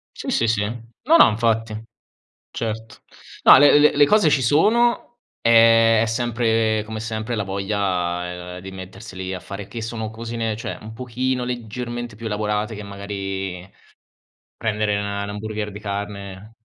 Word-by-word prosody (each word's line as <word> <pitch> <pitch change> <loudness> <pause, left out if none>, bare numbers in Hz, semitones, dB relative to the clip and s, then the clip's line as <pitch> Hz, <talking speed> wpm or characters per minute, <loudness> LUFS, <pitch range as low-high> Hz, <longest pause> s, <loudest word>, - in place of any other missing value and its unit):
Sì, - - -6
sì, 115 - +1
sì. 110 -2 +1
No, 120 - 0
no, - - +8
infatti. 115 0 0 0.8
Certo. 110 0 -5 0.4
No, - - +9
le 145 +1 +7
le 150 0 +5
le 145 0 +6
cose 210 -5 +4
ci 140 -2 +2
sono, 235 - +2 0.2
ehm, 115 -1 +6
è - - +1
sempre 115 -2 +1
come 110 0 -6
sempre 110 +1 -3
la 105 - -1
voglia 90 -3 -3
di 95 - -9
metterseli 95 0 -8
a 90 - -5
fare, 100 0 -8
che 115 - -7
sono 110 -1 -4
cosine, 115 0 -4
cioè, 115 - -6
un 110 +1 -9
pochino, 125 +1 -2
leggermente, 120 -1 -5
più 115 +2 -10
elaborate 105 +1 -2
che 105 - -7
magari 95 -2 -5 0.9
prendere, 105 -2 0
'na 100 0 -3
'na 100 - -6
hamburger 105 0 -5
di 105 - -8
carne 100 0 -6
110 Hz, 150 wpm, -22 LUFS, 100-115 Hz, 0.9 s, No